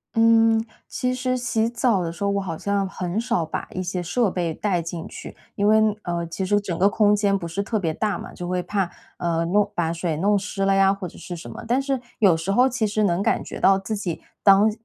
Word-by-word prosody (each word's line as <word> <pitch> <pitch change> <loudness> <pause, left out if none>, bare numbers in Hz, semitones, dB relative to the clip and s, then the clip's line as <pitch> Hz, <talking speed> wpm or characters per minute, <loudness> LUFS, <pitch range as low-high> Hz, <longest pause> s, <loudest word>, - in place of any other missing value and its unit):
嗯， 225 0 +5 0.2
其 250 0 -1
实 255 0 -1
洗 230 -2 0
澡 235 -4 +1
的 170 -1 -2
时 170 +4 -7
候， 200 - +2
我 200 - 0
好 170 -4 -4
像 200 +1 -1
很 185 +1 -3
少 235 -9 0
把 155 - -5
一 185 - -3
些 180 0 -3
设 195 +5 0
备 175 -3 -1
带 180 -1 -1
进 165 0 -6
去， - - -9 0.2
因 205 - +1
为， 215 +1 +6 0.2
呃， 170 -1 -2
其 180 +3 -4
实 205 +2 +2
整 190 -5 -4
个 195 +2 +5
空 210 0 +3
间 200 -1 +2
不 170 - -6
是 170 +4 -3
特 215 +2 -1
别 165 -5 -1
大 205 0 -1
嘛， - - -9
就 175 - -6
会 180 0 -1
怕， 195 0 -1 0.3
呃， 170 -1 0
弄 205 +4 +2
把 165 -2 0
水 165 -2 -2
弄 205 +5 +2
湿 195 0 -3
了 195 - +3
呀， 195 0 +5
或 195 -2 -6
者 - - -13
是 175 - -7
什 170 - -9
么。 - - -8
但 245 +3 +2
是 270 -1 -1 0.2
有 195 -6 +5
时 165 +4 -2
候 250 +6 +5
其 240 -4 0
实 215 +1 0
能 180 -2 +1
感 - - +1
觉 - - -7
到 195 0 +5
自 195 +3 -4
己 185 -5 -4 0.2
当 200 +2 +6
195 Hz, 265 characters per minute, -23 LUFS, 175-215 Hz, 0.3 s, 为